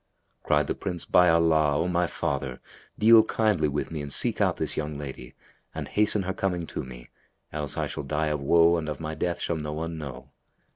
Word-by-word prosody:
Cried 75 -1 +2
the - - -1
Prince, 90 -3 -5
"By 90 -1 +5
Allah, 80 -3 +3
O 85 - 0
my 90 -1 +1
father, 70 -4 -3 0.4
deal 110 +1 +7
kindly 105 -8 +1
with 75 +2 -3
me 80 -2 -4
and 70 0 -6
seek - - +1
out - - +2
this - - -2
young 75 -1 -3
lady 65 -4 -8 0.4
and - - -4
hasten 105 -1 +1
her 95 +1 -2
coming 90 -4 -2
to - - -3
me; - - -11 0.4
else 75 -3 -4
I - - 0
shall - - -5
die 75 +2 -1
of 75 -1 -2
woe 85 +4 +4
and 80 -2 -3
of 75 - -5
my 80 -1 -4
death 85 +2 -2
shall 85 - -1
no 75 -1 -4
one 80 +1 -4
know." 70 -4 -8
80 Hz, 210 wpm, -26 LUFS, 75-85 Hz, 0.4 s, deal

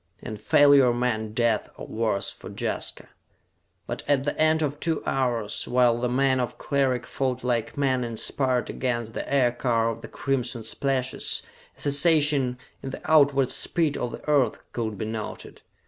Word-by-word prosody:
And 110 -3 -7
failure 140 0 +6
meant 110 -3 -1
death 115 -3 +1
or - - -7
worse 110 -3 -1
for - - -10
Jaska. - - -3 0.8
But - - -5
at 140 -2 +2
the 145 - -2
end 155 0 +3
of 145 0 -2
two 165 -1 -1
hours, 120 -5 -1
while 120 -1 +3
the 125 0 0
men 130 +1 +2
of 125 - -3
Cleric 130 -4 0
fought 130 0 -2
like 120 -1 -1
men 130 -3 +1
inspired 125 +2 -1
against 120 -3 -2
the - - -5
aircar 120 -3 +2
of 115 - -8
the - - -8
crimson 125 -4 -2
slashes, 130 0 -1 0.3
a - - -10
cessation 145 -3 +3 0.2
in 135 - -5
the 135 - -7
outward 140 -4 +4
speed 160 -4 0
of 120 - -3
the - - -10
earth 140 -7 +2
could 110 -3 -3
be 110 - -3
noted. 110 -1 -6
125 Hz, 165 wpm, -25 LUFS, 120-140 Hz, 0.8 s, failure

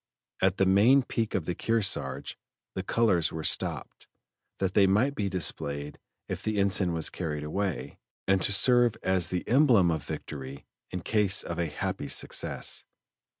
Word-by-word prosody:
At 95 0 +2
the 95 - +3
main 110 +9 +5
peak 115 -2 -2
of 90 -5 -1
the 90 - -2
Kearsarge 110 +1 -1 0.4
the 95 - -3
colors 95 -6 +1
were 80 0 -5
stopped, - - -2 0.5
that 95 -1 -1
they 100 -1 +5
might 110 +9 +2
be 100 -6 -2
displayed 75 -5 -2 0.3
if - - -5
the 110 -1 -2
ensign 95 -2 +2
was 80 -2 0
carried 75 -4 -4
away, 95 +4 -3 0.3
and 95 -1 +3
to - - +2
serve 120 +2 +4
as 95 -2 +2
the 90 -1 -3
emblem 120 - +4
of 80 -2 -3
victory 70 -1 -7 0.2
in 90 - -5
case 100 0 +2
of 85 0 -5
a 85 - 0
happy 75 - -4
success. - - -1
95 Hz, 160 wpm, -28 LUFS, 85-105 Hz, 0.5 s, main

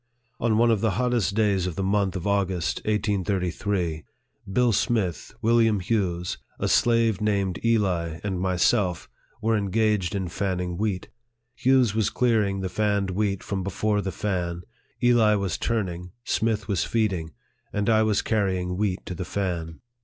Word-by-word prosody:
On 115 -2 +2
one 120 +1 +4
of 110 -3 +1
the 110 -4 +1
hottest 120 -6 +1
days 100 -4 +2
of 90 - -4
the 95 - -2
month 100 0 +1
of 90 - -4
August, 95 -5 0
1833, 95 -5 -1 0.5
Bill 125 +3 +3
Smith, 100 - 0
William 115 -2 +4
Hughes, 90 -3 -1 0.2
a - - -1
slave 115 -4 +3
named 100 -3 0
Eli, 90 -8 +1
and 95 -3 -2
myself, 90 0 +1 0.4
were 115 0 +2
engaged 105 -2 +1
in 95 -2 -2
fanning 90 -1 -2
wheat. 100 -1 -2 0.4
Hughes 130 -5 +3
was 110 -2 +1
clearing 105 -6 +1
the 95 - -1
fanned 100 0 0
wheat 100 0 -1
from 100 -2 -3
before 105 +2 0
the 95 - -3
fan, 90 -2 -2 0.4
Eli 115 -3 +5
was 100 -4 -2
turning, 90 -6 -2
Smith 110 -2 0
was 100 -3 +1
feeding, 95 -8 -1 0.4
and 105 -1 -1
I 110 -1 +4
was 110 -2 +2
carrying 95 -4 0
wheat 100 -2 -1
to - - -5
the 90 - -4
fan. 85 -4 -3
100 Hz, 155 wpm, -25 LUFS, 90-110 Hz, 0.5 s, Eli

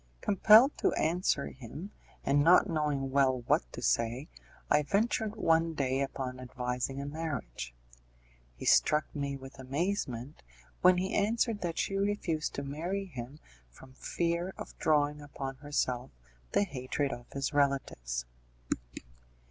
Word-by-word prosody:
Compelled 220 +7 +6
to - - +3
answer 160 -3 +1
him, 140 - -9 0.3
and 145 +1 +4
not 180 +5 +6
knowing 150 -5 -1
well 130 -2 +3
what - - +1
to - - -7
say, 115 +5 +1 0.4
I 150 - +4
ventured 215 +6 0
one 165 -5 +2
day 135 -1 0
upon 130 -2 -3
advising 125 +1 -3
a 140 - -4
marriage. 140 - -5 0.8
He - - -8
struck 150 +1 +3
me 140 -1 -2
with 135 0 -12
amazement 135 -2 -2 0.4
when 180 0 +6
he 190 +2 -1
answered 220 +1 +1
that 170 -2 -2
she 195 - 0
refused 195 -6 -1
to 140 - -3
marry 170 +8 -3
him 135 -5 -8 0.3
from 130 - -16
fear 170 +6 -2
of - - -8
drawing 150 -1 +2
upon 135 -2 -6
herself 130 -3 -1 0.4
the - - +4
hatred 140 -4 -2
of 120 0 -10
his 140 +2 -2
relatives. 95 - 0
145 Hz, 135 wpm, -31 LUFS, 130-170 Hz, 0.8 s, Compelled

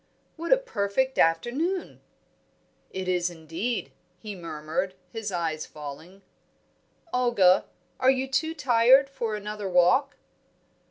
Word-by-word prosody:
"What 335 +1 -5
a - - +8
perfect 260 - -1
afternoon!" 255 - 0 0.9
"It 190 -1 -5
is, 180 -1 +1
indeed," 170 +8 -4 0.3
he 210 0 -7
murmured, 165 +1 -4 0.2
his 220 -1 -4
eyes 165 -3 -2
falling. 155 +6 -10 0.9
"Olga, 235 -8 +4 0.3
are 260 - +4
you 265 0 +2
too 315 +5 -1
tired 265 0 +5
for 235 -5 -3
another 210 -1 -5
walk?" 180 +10 +3
210 Hz, 110 wpm, -26 LUFS, 175-260 Hz, 0.9 s, a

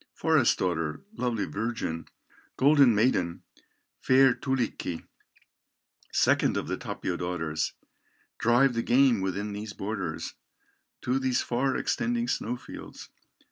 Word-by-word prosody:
"Forest 155 -7 +3
daughter, 80 -4 -1
lovely 120 - -1
virgin, 105 -7 -3 0.5
Golden 140 -4 +5
maiden, 100 -7 +1 0.6
fair 130 0 +5
Tulikki, 125 -11 -2 1.1
Second - - +3
of - - -3
the - - -1
Tapio 90 - -4
daughters, 80 -3 -2 0.7
Drive 125 +3 +4
the 115 - 0
game 125 -3 +4
within 100 +2 -2
these 105 0 -6
borders, 95 -6 -4 0.7
To 130 +2 0
these 130 -2 +1
far 130 +2 0
extending 240 0 -1
snow 125 - -2
fields. - - -11
115 Hz, 110 wpm, -28 LUFS, 95-130 Hz, 1.1 s, Golden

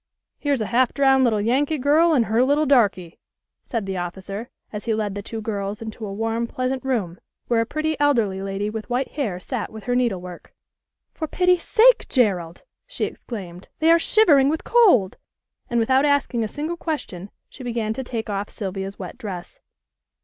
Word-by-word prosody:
"Here's 285 -5 0
a - - 0
half 250 0 +3
drowned 270 -1 +4
little 225 -4 +2
Yankee 270 +8 +1
girl 300 +5 +4
and 255 -7 +3
her 225 +3 +2
little 290 +3 +2
darky," 205 - +2 0.4
said 230 -6 -3
the 190 -1 -3
officer, 190 +5 -5 0.2
as 210 - -6
he 225 -2 +1
led 210 -2 -2
the 200 - -5
two 220 +2 -6
girls 205 -1 -3
into 220 -1 -7
a - - -6
warm 225 +3 -2
pleasant 255 +1 -2
room 210 -10 -2 0.3
where 235 -1 +2
a 230 - -2
pretty 310 +2 -1
elderly 230 -10 +2
lady 195 +1 -3
with 215 +2 -5
white 250 +2 -1
hair 220 -12 -3
sat 235 +4 -4
with 220 -1 -9
her 245 - -1
needlework. 190 -8 -2 0.6
"For 315 - -4
pity 360 +3 +3
sake, - - +4
Gerald!" 185 - 0 0.2
she - - -2
exclaimed. 185 -6 -8
"They 320 +1 +4
are 335 - +6
shivering 300 -9 +4
with 315 +1 -2
cold," 360 - +4 0.5
and 235 - +1
without 260 +4 +3
asking 285 -5 +1
a - - -1
single 310 +9 -4
question 205 - -5 0.2
she 260 - -12
began 230 -3 -2
to 265 - -5
take 230 -3 -4
off 200 -1 -3
Sylvia's 195 -1 -5
wet 190 +6 -8
dress. 190 -7 -7
230 Hz, 185 wpm, -23 LUFS, 200-275 Hz, 0.6 s, are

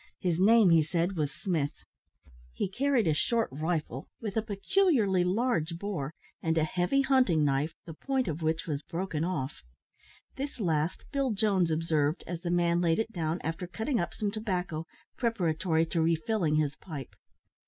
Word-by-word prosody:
His 175 -2 0
name, 210 -1 +6
he 165 -1 +6
said, 170 +4 0
was 150 -3 -1
Smith. 155 -6 -2 0.7
He - - -1
carried 255 +3 +1
a 160 - +3
short 230 +9 +1
rifle, 155 -2 -2
with 210 -4 -5
a 220 - +2
peculiarly 215 - +2
large 180 -4 0
bore, 170 -7 -4 0.3
and 160 0 0
a 160 - +4
heavy 180 - +1
hunting 255 - +3
knife, 140 +3 0
the 165 - -7
point 265 - -1
of 160 0 -3
which 160 +1 0
was 150 -3 -2
broken 165 -1 -3
off. 160 -7 -3 0.8
This 275 -1 -5
last 160 -4 0
Bill 275 -2 +1
Jones 195 -4 +2
observed, 155 -1 0
as 175 -1 -5
the 175 - -3
man 175 0 +2
laid 165 -2 +2
it 225 0 -1
down, 165 -3 -2
after 165 +3 -3
cutting 225 +7 -1
up 175 - -2
some 205 -2 -1
tobacco, 180 -6 -3 0.3
preparatory 170 -7 +1
to 165 0 -1
refilling 165 +1 +1
his 150 -2 +1
pipe. 150 -6 -8
175 Hz, 165 wpm, -29 LUFS, 160-210 Hz, 0.8 s, name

